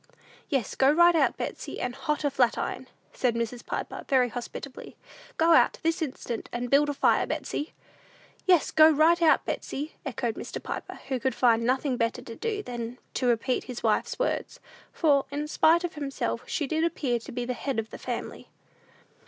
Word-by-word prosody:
"Yes; 270 Hz, -, -1 dB
go 265 Hz, -, +4 dB
right 345 Hz, +3 st, +6 dB
out, 320 Hz, -, +2 dB
Betsey, -, -, -5 dB
and 245 Hz, -, -2 dB
hot 300 Hz, +4 st, -2 dB
a 290 Hz, -, +1 dB
flatiron," 255 Hz, 0 st, 0 dB, 0.3 s
said 245 Hz, -3 st, 0 dB
Mrs. 235 Hz, +1 st, -3 dB
Piper, -, -, -5 dB
very 255 Hz, -2 st, +4 dB
hospitably. 245 Hz, +3 st, -7 dB, 0.4 s
"Go 330 Hz, +1 st, +5 dB
out, -, -, +5 dB
this 330 Hz, +2 st, 0 dB
instant, 255 Hz, -5 st, -4 dB
and 240 Hz, 0 st, -4 dB
build 290 Hz, +1 st, +5 dB
a -, -, 0 dB
fire, -, -, +3 dB
Betsey." 295 Hz, -, -3 dB, 0.7 s
"Yes, 355 Hz, -4 st, +4 dB
go 315 Hz, 0 st, +7 dB
right 320 Hz, +3 st, +4 dB
out, 325 Hz, -, +4 dB
Betsey," 295 Hz, +4 st, -4 dB
echoed 240 Hz, -5 st, -3 dB
Mr. -, -, -6 dB
Piper, -, -, -6 dB
who 260 Hz, -2 st, 0 dB
could 260 Hz, +2 st, -1 dB
find 230 Hz, -2 st, +3 dB
nothing 260 Hz, 0 st, +1 dB
better 230 Hz, +1 st, -1 dB
to 230 Hz, -2 st, -9 dB
do 425 Hz, -, -3 dB
than 240 Hz, -, -5 dB, 0.2 s
to 250 Hz, -, 0 dB
repeat 245 Hz, +2 st, +1 dB
his 250 Hz, -2 st, -7 dB
wife's 220 Hz, -2 st, +1 dB
words; -, -, -2 dB, 0.3 s
for, 285 Hz, -4 st, +2 dB
in 290 Hz, +2 st, -3 dB
spite 325 Hz, +3 st, +4 dB
of 350 Hz, -, -3 dB
himself, 285 Hz, -3 st, -3 dB
she 300 Hz, -, -1 dB
did 315 Hz, +4 st, 0 dB
appear 275 Hz, -8 st, 0 dB
to 225 Hz, -, -10 dB
be 245 Hz, 0 st, -3 dB
the 250 Hz, -, -2 dB
"head 255 Hz, +2 st, -3 dB
of 220 Hz, 0 st, -3 dB
the -, -, -8 dB
family." -, -, -5 dB
270 Hz, 185 wpm, -27 LUFS, 245-310 Hz, 0.7 s, go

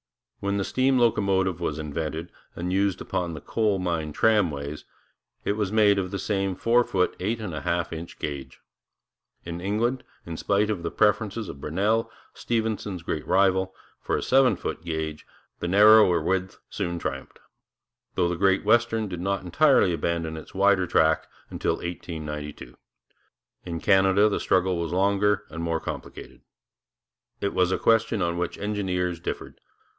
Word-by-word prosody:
When 100 Hz, 0 st, -1 dB
the 100 Hz, -, 0 dB
steam 130 Hz, +5 st, +2 dB
locomotive 95 Hz, -6 st, +2 dB
was 80 Hz, -4 st, -2 dB
invented, 80 Hz, +2 st, -4 dB, 0.2 s
and 90 Hz, +1 st, -3 dB
used 95 Hz, -1 st, +1 dB
upon 85 Hz, -2 st, -3 dB
the 75 Hz, -, -8 dB
coal 110 Hz, -3 st, 0 dB
mine 85 Hz, -4 st, -2 dB
tramways, 75 Hz, -7 st, +1 dB, 0.6 s
it -, -, +1 dB
was 105 Hz, -2 st, -1 dB
made 105 Hz, -2 st, +4 dB
of 90 Hz, -1 st, -2 dB
the 100 Hz, -, -3 dB
same 95 Hz, -1 st, -1 dB
four 120 Hz, +5 st, +3 dB
foot 90 Hz, -5 st, 0 dB
eight 110 Hz, +5 st, -1 dB
and 105 Hz, -6 st, -5 dB
a 75 Hz, -, -4 dB
half 85 Hz, +2 st, -1 dB
inch 80 Hz, +1 st, -8 dB
gauge. 70 Hz, -2 st, -6 dB, 0.9 s
In 85 Hz, 0 st, -5 dB
England, 115 Hz, +7 st, 0 dB, 0.2 s
in 85 Hz, -1 st, -6 dB
spite 105 Hz, +4 st, +1 dB
of 100 Hz, -5 st, -3 dB
the 85 Hz, -, -2 dB
preferences 105 Hz, +1 st, +1 dB
of 70 Hz, -, -9 dB
Brunel, 105 Hz, +8 st, 0 dB, 0.2 s
Stephenson's 110 Hz, -6 st, -2 dB
great 75 Hz, -2 st, -4 dB
rival, 95 Hz, -1 st, +2 dB, 0.3 s
for -, -, -1 dB
a -, -, -3 dB
seven 130 Hz, -1 st, +4 dB
foot -, -, -5 dB
gauge, 80 Hz, -2 st, -4 dB, 0.3 s
the -, -, -3 dB
narrower 105 Hz, -1 st, +6 dB
width 95 Hz, +3 st, -1 dB
soon 85 Hz, -4 st, -3 dB
triumphed, 70 Hz, -5 st, -5 dB, 0.8 s
though 85 Hz, -, +2 dB
the 85 Hz, -, -1 dB
Great 95 Hz, +2 st, +2 dB
Western 115 Hz, 0 st, +2 dB
did 90 Hz, -3 st, -6 dB
not 100 Hz, 0 st, -1 dB
entirely 95 Hz, -, +4 dB
abandon 85 Hz, 0 st, -2 dB
its 80 Hz, -, -10 dB
wider 95 Hz, -1 st, +3 dB
track 80 Hz, -2 st, +2 dB, 0.2 s
until -, -, 0 dB
1892. 75 Hz, -4 st, -6 dB, 0.9 s
In 85 Hz, -1 st, -3 dB
Canada 95 Hz, +2 st, +4 dB
the 105 Hz, -, 0 dB
struggle 90 Hz, -1 st, +1 dB
was 85 Hz, -1 st, -3 dB
longer 100 Hz, +2 st, +2 dB
and 80 Hz, +1 st, -5 dB
more 85 Hz, -1 st, -1 dB
complicated. 80 Hz, -4 st, -8 dB, 1.0 s
It 100 Hz, -, -2 dB
was 90 Hz, 0 st, +2 dB
a -, -, +1 dB
question 115 Hz, -3 st, +2 dB
on 85 Hz, 0 st, -1 dB
which 90 Hz, -, -3 dB
engineers 90 Hz, -4 st, -2 dB
differed. -, -, -6 dB
95 Hz, 160 wpm, -25 LUFS, 85-105 Hz, 1.0 s, narrower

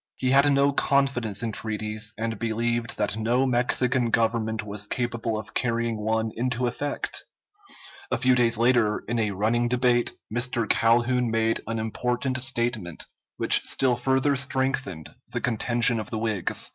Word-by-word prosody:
He 130 Hz, -, -1 dB
had 140 Hz, +2 st, +5 dB
no 140 Hz, 0 st, +3 dB
confidence 135 Hz, -7 st, +1 dB
in 115 Hz, -, -1 dB
treaties, 110 Hz, 0 st, -3 dB
and 110 Hz, -1 st, -3 dB
believed 115 Hz, +1 st, -2 dB
that 105 Hz, -1 st, -1 dB
no 120 Hz, +4 st, +1 dB
Mexican 125 Hz, 0 st, +1 dB
government 110 Hz, -1 st, 0 dB
was 105 Hz, 0 st, -3 dB
capable 120 Hz, -2 st, -2 dB
of 110 Hz, +1 st, -8 dB
carrying 115 Hz, -2 st, -1 dB
one 110 Hz, 0 st, 0 dB
into 125 Hz, +1 st, -1 dB
effect. 145 Hz, +4 st, -2 dB, 0.9 s
A -, -, 0 dB
few 130 Hz, -1 st, +3 dB
days 120 Hz, -2 st, +2 dB
later, 115 Hz, -3 st, +2 dB
in 120 Hz, +1 st, -1 dB
a 110 Hz, -2 st, +1 dB
running 110 Hz, +5 st, 0 dB
debate, 125 Hz, -1 st, +2 dB, 0.2 s
Mr. 120 Hz, -1 st, 0 dB
Calhoun 120 Hz, +2 st, +2 dB
made 115 Hz, 0 st, +1 dB
an 115 Hz, 0 st, -2 dB
important 125 Hz, +4 st, -2 dB
statement, 120 Hz, -9 st, -2 dB, 0.3 s
which -, -, +6 dB
still 130 Hz, -2 st, +1 dB
further 130 Hz, +3 st, +1 dB
strengthened 130 Hz, -, -1 dB, 0.2 s
the -, -, -2 dB
contention 120 Hz, 0 st, +1 dB
of 110 Hz, -, -6 dB
the 110 Hz, -, -4 dB
Whigs. 110 Hz, -4 st, -1 dB
120 Hz, 150 wpm, -25 LUFS, 110-125 Hz, 0.9 s, which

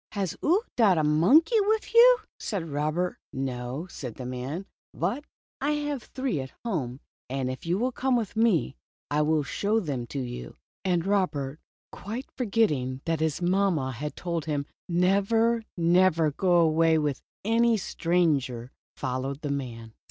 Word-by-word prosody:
" -, -, -67 dB
Has 195 Hz, -5 st, -2 dB
00 355 Hz, +7 st, +4 dB
dot 205 Hz, -7 st, +4 dB
a 155 Hz, -, +2 dB
monkey 255 Hz, -, +5 dB
wif 430 Hz, +2 st, +1 dB
00?" -, -, -13 dB, 0.4 s
said 190 Hz, -7 st, -3 dB
Robert. 155 Hz, +4 st, -1 dB
No," 130 Hz, +2 st, -4 dB
said 130 Hz, -10 st, -7 dB
the 125 Hz, -, -7 dB
man, 130 Hz, +9 st, -4 dB, 0.3 s
"but 235 Hz, -, -2 dB, 0.4 s
I 290 Hz, +2 st, +1 dB
have 295 Hz, -3 st, -2 dB
three 260 Hz, -, -3 dB
at 130 Hz, 0 st, -6 dB
home, 140 Hz, -, -2 dB, 0.3 s
and 130 Hz, -1 st, -1 dB
if 130 Hz, +5 st, -8 dB
you 175 Hz, +2 st, +1 dB
will 250 Hz, +4 st, 0 dB
come 255 Hz, +1 st, 0 dB
with 225 Hz, -4 st, -2 dB
me, 220 Hz, -, +2 dB, 0.4 s
I 150 Hz, +1 st, +2 dB
will 155 Hz, 0 st, +2 dB
show 205 Hz, +9 st, 0 dB
them 135 Hz, -, -3 dB
to 140 Hz, -, -4 dB
you." 125 Hz, -1 st, -6 dB, 0.3 s
And 180 Hz, -3 st, +1 dB
Robert, 160 Hz, -8 st, 0 dB, 0.3 s
quite 230 Hz, +7 st, -6 dB
forgetting 150 Hz, -, 0 dB
that 165 Hz, -2 st, 0 dB
his 160 Hz, +2 st, -1 dB
mamma 175 Hz, -7 st, +1 dB
had 150 Hz, +4 st, -5 dB
told 170 Hz, -3 st, -3 dB
him 145 Hz, -2 st, -1 dB, 0.2 s
never, 200 Hz, +6 st, +2 dB, 0.2 s
never 170 Hz, -2 st, +4 dB
to -, -, -22 dB
go 180 Hz, -2 st, +2 dB
away 165 Hz, -1 st, +4 dB
with 150 Hz, -3 st, -1 dB, 0.2 s
any 230 Hz, +1 st, +3 dB
stranger, 145 Hz, -, 0 dB, 0.2 s
followed 135 Hz, +2 st, -3 dB
the 145 Hz, -3 st, -2 dB
man. 115 Hz, -5 st, -5 dB
165 Hz, 160 wpm, -27 LUFS, 140-205 Hz, 0.4 s, monkey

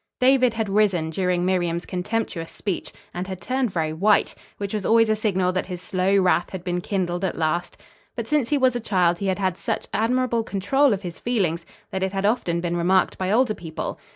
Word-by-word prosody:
David 255 Hz, -2 st, +4 dB
had 220 Hz, -1 st, -1 dB
risen 195 Hz, -6 st, +2 dB
during 180 Hz, 0 st, 0 dB
Miriam's 175 Hz, -2 st, 0 dB
contemptuous 180 Hz, -3 st, -3 dB
speech, 195 Hz, -4 st, -4 dB, 0.2 s
and 180 Hz, +1 st, -4 dB
had 190 Hz, -2 st, -6 dB
turned 255 Hz, +4 st, -1 dB
very 160 Hz, -4 st, -1 dB
white; 200 Hz, +6 st, +3 dB, 0.2 s
which 200 Hz, 0 st, -4 dB
was 210 Hz, -2 st, -2 dB
always 225 Hz, +1 st, +4 dB
a 215 Hz, -, +3 dB
signal 190 Hz, -4 st, +1 dB
that 185 Hz, 0 st, -2 dB
his 180 Hz, -2 st, -5 dB
slow 185 Hz, +2 st, +1 dB
wrath 180 Hz, -2 st, +2 dB
had 190 Hz, -2 st, -7 dB
been 180 Hz, -1 st, -2 dB
kindled 180 Hz, -2 st, -2 dB
at 190 Hz, -, -1 dB
last; 165 Hz, +2 st, -1 dB, 0.4 s
but -, -, -3 dB
since 295 Hz, -6 st, +1 dB
he 295 Hz, -, +2 dB
was 260 Hz, -2 st, +3 dB
a -, -, 0 dB
child 180 Hz, -6 st, +1 dB
he 200 Hz, -, -2 dB
had 190 Hz, -, +1 dB
had 185 Hz, -3 st, -1 dB
such -, -, -3 dB
admirable 240 Hz, +1 st, +1 dB
control 220 Hz, +8 st, +2 dB
of 200 Hz, -1 st, -1 dB
his 175 Hz, -2 st, -6 dB
feelings 180 Hz, -9 st, -1 dB, 0.2 s
that 190 Hz, -, -3 dB
it 190 Hz, 0 st, -1 dB
had 195 Hz, 0 st, -1 dB
often 175 Hz, -6 st, +1 dB
been 175 Hz, 0 st, -1 dB
remarked 180 Hz, +2 st, +2 dB
by 185 Hz, 0 st, 0 dB
older 235 Hz, 0 st, +3 dB
people. 165 Hz, -5 st, -6 dB
190 Hz, 210 wpm, -23 LUFS, 175-220 Hz, 0.4 s, David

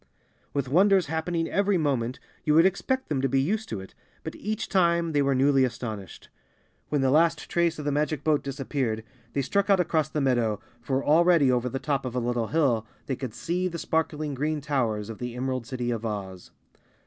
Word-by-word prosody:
With 140 Hz, -2 st, -1 dB
wonders 190 Hz, +5 st, +4 dB
happening 165 Hz, +2 st, -1 dB
every 200 Hz, -1 st, +2 dB
moment, 130 Hz, -6 st, -1 dB, 0.2 s
you 150 Hz, -, +2 dB
would 165 Hz, +2 st, +7 dB
expect 260 Hz, +8 st, 0 dB
them 140 Hz, -4 st, -1 dB
to 135 Hz, -, +1 dB
be 135 Hz, +1 st, +2 dB
used 205 Hz, +11 st, -1 dB
to 110 Hz, -, -3 dB
it, 95 Hz, -, -12 dB, 0.3 s
but -, -, -5 dB
each 215 Hz, +1 st, -3 dB
time 170 Hz, -3 st, +2 dB
they 145 Hz, -2 st, +2 dB
were 140 Hz, -1 st, +2 dB
newly 135 Hz, 0 st, +4 dB
astonished. 110 Hz, -7 st, -5 dB, 0.6 s
When 145 Hz, -2 st, +1 dB
the 135 Hz, -1 st, +3 dB
last 165 Hz, +3 st, +3 dB
trace 170 Hz, -1 st, +1 dB
of 150 Hz, -, -6 dB
the 145 Hz, -, +1 dB
magic 150 Hz, 0 st, -1 dB
boat 155 Hz, -2 st, +2 dB
disappeared, 135 Hz, -5 st, -2 dB, 0.3 s
they 140 Hz, -, 0 dB
struck 200 Hz, +8 st, 0 dB
out 195 Hz, -2 st, +5 dB
across 160 Hz, -4 st, +1 dB
the 155 Hz, -, -2 dB
meadow, 120 Hz, -6 st, +1 dB, 0.2 s
for 135 Hz, +2 st, -1 dB
already 165 Hz, -3 st, +5 dB
over 125 Hz, 0 st, +1 dB
the 135 Hz, -, -3 dB
top 140 Hz, 0 st, -1 dB
of 125 Hz, -1 st, -5 dB
a -, -, +1 dB
little 120 Hz, -1 st, -1 dB
hill 125 Hz, -8 st, +1 dB, 0.2 s
they 135 Hz, -, -2 dB
could 125 Hz, -3 st, -6 dB
see 180 Hz, +2 st, -1 dB
the 170 Hz, -2 st, -4 dB
sparkling 155 Hz, -2 st, -1 dB
green 150 Hz, +3 st, -1 dB
towers 120 Hz, -8 st, -1 dB
of 115 Hz, -2 st, -8 dB
the 125 Hz, -1 st, -5 dB
Emerald 130 Hz, -1 st, -3 dB
City 125 Hz, -1 st, -2 dB
of 115 Hz, -1 st, -3 dB
Oz. 95 Hz, -4 st, -5 dB
140 Hz, 205 wpm, -26 LUFS, 125-165 Hz, 0.6 s, would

